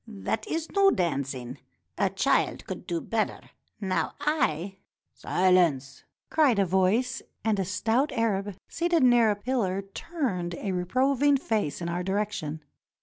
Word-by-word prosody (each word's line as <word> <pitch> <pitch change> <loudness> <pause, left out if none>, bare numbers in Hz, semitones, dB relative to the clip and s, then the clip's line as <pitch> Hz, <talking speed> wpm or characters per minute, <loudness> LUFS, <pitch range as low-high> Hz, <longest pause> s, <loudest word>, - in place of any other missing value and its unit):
That 220 0 -3
is 325 0 -3
no 395 -1 +5
dancing. 135 - -2 0.4
A - - +1
child - - +1
could - - -7
do 170 -1 -1
better. 225 +4 -3 0.3
Now 190 -3 -1
I 195 - 0
— - - -67
" - - -55
"Silence! 170 -8 +1
" - - -60
cried 290 -8 +4
a 200 - +3
voice, 190 +7 +1 0.2
and 215 -3 +2
a 190 - 0
stout 225 - 0
Arab 205 -5 -1
seated 340 -3 +1
near 240 -3 +5
a 210 - +2
pillar 205 -4 -1
turned 195 - -3
a 195 +2 -3
reproving 265 +10 +2
face 215 - -2
in - - -2
our 170 +1 -2
direction. 190 -6 -2
200 Hz, 150 wpm, -27 LUFS, 180-250 Hz, 0.4 s, no